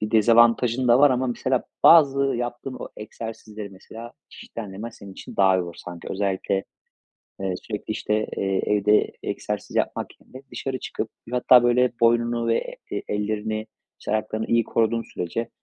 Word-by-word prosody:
bir 105 - -3
dezavantajın 120 +2 +4
da 120 +2 +6
var 145 -1 +7
ama, 130 +1 +1
mesela, 125 +1 -1 0.2
bazı 140 -5 +7
yaptığın 120 0 -2
o - - -7
egzersizleri, 110 -1 -8
mesela, 115 +5 -11 0.2
çeşitlendirmen 105 0 -8
senin 100 -3 -12
için - - -11
daha 95 -1 +4
iyi - - 0
olur 85 -1 -8
sanki. 85 -1 -9
Özellikle, 95 0 -1 0.8
eee, 95 -1 -1
sürekli, 105 +1 -6
işte, 110 0 -1
eee, 95 -1 0
evde 105 0 +3
egzersiz - - -4
yapmak - - -2
yerine 130 +1 -13
dışarı 130 +2 -4
çıkıp, - - -5 0.2
hatta, 125 0 +6
böyle, 125 +1 +3
boynunu 115 0 +2
ve 115 - -1
e - - -3
ellerini, 110 +1 -2 0.3
işte, - - -4
ayaklarını 110 0 -1
iyi 115 -1 +2
koruduğun 115 0 +1
sürece 90 +7 -3
115 Hz, 155 wpm, -24 LUFS, 105-120 Hz, 0.8 s, var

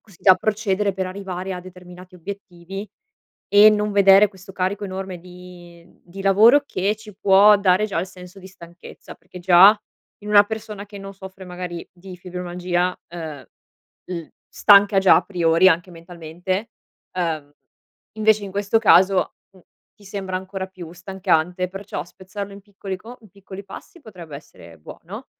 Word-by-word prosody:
Così 195 -5 -21
da 190 -2 +7
procedere 205 -1 -1
per 190 0 -3
arrivare 190 0 -6
a 180 - -6
determinati 180 0 -14
obiettivi 195 +1 -9 0.6
e 205 +1 +7
non 210 0 0
vedere 200 +1 +6
questo 195 0 -15
carico 190 +2 -2
enorme 190 -1 -6
di 175 -1 -14 0.2
di 190 +3 -10
lavoro 220 +9 +5
che 200 +3 -1
ci 215 -1 -13
può 205 +1 +6
dare 190 0 +2
già 195 - -3
il 185 - -4
senso 180 +1 -14
di 190 - -12
stanchezza, 170 -1 -14
perché 180 - -14
già 190 +4 +7 0.5
in 210 - -9
una 205 -1 +7
persona 210 -1 -7
che 200 0 -11
non 195 0 -9
soffre 190 0 -11
magari 180 -1 -7
di 185 0 -12
fibromialgia, 180 0 -3 0.2
uhm, 155 -5 -7 0.6
l 170 -3 -6 0.2
stanca 205 -1 +5
già 190 - +6
a - - +1
priori 170 -1 +3
anche 175 +1 +1
mentalmente, 175 +5 -6 0.5
uhm, 155 -5 -3 0.6
invece 215 -1 +2
in 195 - -8
questo 205 +3 0
caso, 190 -2 +4 0.2
n - - -18 0.4
ti 205 - -20
sembra 190 -2 -4
ancora 190 0 -6
più 175 -3 -11
stancante, 180 -1 -1
perciò 195 -5 -7
spezzarlo 195 +2 -9
in 200 - -12
piccoli 195 -1 -7
co 235 +6 -12
in 215 - -18
piccoli 195 +1 -11
passi 340 - -12
potrebbe 175 - -11
essere 85 - -16
buono - - -11
190 Hz, 160 wpm, -21 LUFS, 180-200 Hz, 0.6 s, da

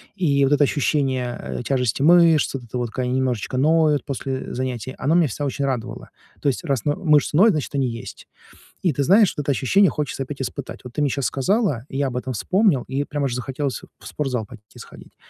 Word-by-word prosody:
И 140 -8 +2
вот 135 - +2
это 145 - +4
ощущение, 130 -3 0
э, - - -5
тяжести 125 -2 0
мышц, 165 -1 +5
вот 135 -2 -5
это 120 +2 -6
вот, 120 -2 -3
как 130 +2 -2
они 125 - -1
немножечко 130 -2 -1
ноют 155 0 +3
после 135 -1 -4
занятий, 130 -1 -4
оно 150 +5 +1
меня 170 -3 +4
всегда 145 +4 -3
очень 140 +1 -2
радовало. 125 -3 -4 0.3
То 145 - +1
есть, 135 - -3
раз 140 -7 -1
но 145 - +2
мышцы 150 -4 +2
ноют, 205 +7 +6
значит, 155 -3 -3
они 135 -2 +1
есть. 115 -1 -8 0.6
И 175 - +2
ты 140 - -1
знаешь, 200 +5 +5
вот 145 - -2
это 145 - +1
ощущение 185 +10 +3
хочется 140 -1 -3
опять 135 0 -6
испытать. 130 - -6
Вот 125 - -10
ты - - -2
мне 145 -2 +2
щас 140 0 -1
сказала, 145 - 0
я 135 0 -1
об 125 - -5
этом 130 +1 -3
вспомнил, 185 - +2
и 135 +2 -1
прямо 145 -1 -2
же 120 - -3
захотелось 135 +1 -3 0.2
в - - -14
спортзал 125 -7 -3
пойти 105 -4 -15
сходить. - - -14
135 Hz, 220 wpm, -22 LUFS, 125-150 Hz, 0.6 s, ноют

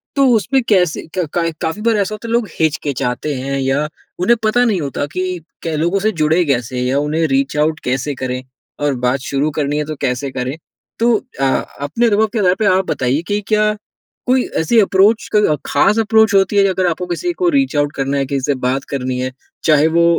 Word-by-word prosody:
तो 275 -1 +4
उसमें 265 +5 +1
कैसे 180 -6 +2
कै 180 -2 0
का 170 -1 +1
काफ़ी 160 +6 -2
बार 230 0 +2
ऐसा 200 0 0
होता 215 +2 -9
है - - -4
लोग 235 -2 +1
हिचकिचाते 145 -3 -1
हैं 135 +1 -3
या 135 +3 0 0.3
उन्हें 190 +7 +4
पता 220 +3 +3
नहीं 210 -6 +1
होता 140 0 -2
कि 185 - -1 0.4
कै 165 -2 -2
लोगों 170 +5 +1
से 215 +3 +1
जुड़े 160 +4 +3
कैसे 125 -3 -1
या 130 +2 +1
उन्हें 155 +3 0
रीच 135 0 0
आउट 155 +1 +1
कैसे 130 +3 -1
करें 125 0 -2 0.4
और 145 - +2
बात 125 +2 +1
शुरू 140 +2 +1
करनी 145 0 0
है 150 - 0
तो 155 +1 -5
कैसे 135 0 -1
करें? 130 +1 -3 0.4
तो 235 +1 +3 0.3
अ, - - 0 0.4
अपने 145 +12 0
अनुभव 220 0 +3
के 230 - 0
आधार 185 -2 +3
पे 220 - +1
आप 190 -1 +3
बताइए 130 +4 0
कि 205 0 0
क्या 215 0 +2 0.5
कोई 255 0 +3 0.2
ऐसी 225 +9 +3
अप्रोच 205 +2 +3
क 205 -8 +3
ख़ास 200 +9 +3
अप्रोच 220 -1 +3
होती 195 +1 +3
है 200 - +5
अगर 185 -1 0
आपको 175 +2 -3
किसी 180 - -2
को 355 +1 +1
रीच 275 - +1
आउट 145 0 +1
करना 135 +1 -1
है 135 - 0
किसी 135 0 -2
से 140 - +1
बात 130 +1 -1
करनी 130 -2 -2
है, 130 0 -2 0.3
चाहे 155 -1 +4
वो 170 +1 +2
160 Hz, 215 wpm, -17 LUFS, 140-210 Hz, 0.5 s, है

